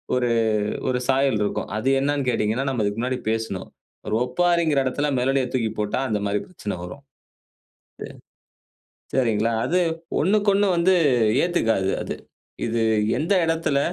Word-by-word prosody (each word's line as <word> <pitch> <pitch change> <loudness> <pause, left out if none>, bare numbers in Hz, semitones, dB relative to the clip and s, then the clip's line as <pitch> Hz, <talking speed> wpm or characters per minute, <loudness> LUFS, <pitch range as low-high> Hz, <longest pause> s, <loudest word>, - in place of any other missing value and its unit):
ஒரு 125 -1 +1 0.6
ஒரு 125 -1 0
சாயல் 135 -4 +2
இருக்கும். 100 - -2
அது 130 +5 0
என்னன்னு 140 -1 0
கேட்டீங்கனா, 115 +3 0
நம்ம 120 -5 -1
இதுக்கு 100 +2 -2
முன்னாடி 125 0 -1
பேசினோம். 110 -4 -3 0.4
ஒரு 105 - 0
ஒப்பாரிகிற 170 +1 +2
இடத்தில, 145 +3 -1
மெலடிய 135 +1 +1
தூக்கி 115 -3 0
போட்டா 105 +5 -1
அந்த 105 -1 -1
மாரி 100 +1 -1
பிரச்சன 105 - -6
வரும். 140 +10 -9 1.0
இது - - -7 1.1
சரிங்களா, 115 -3 +1
அது 180 +2 +1 0.4
ஒண்ணுக்கொண்ணு 200 +2 +3
வந்து 185 +2 +4 0.5
ஏத்துக்காது 115 - +1
அது. - - -5 0.5
இது 115 0 -1 0.4
எந்த 165 +6 +1
இடத்துல, 160 -4 +1
130 Hz, 135 wpm, -23 LUFS, 110-155 Hz, 1.1 s, வந்து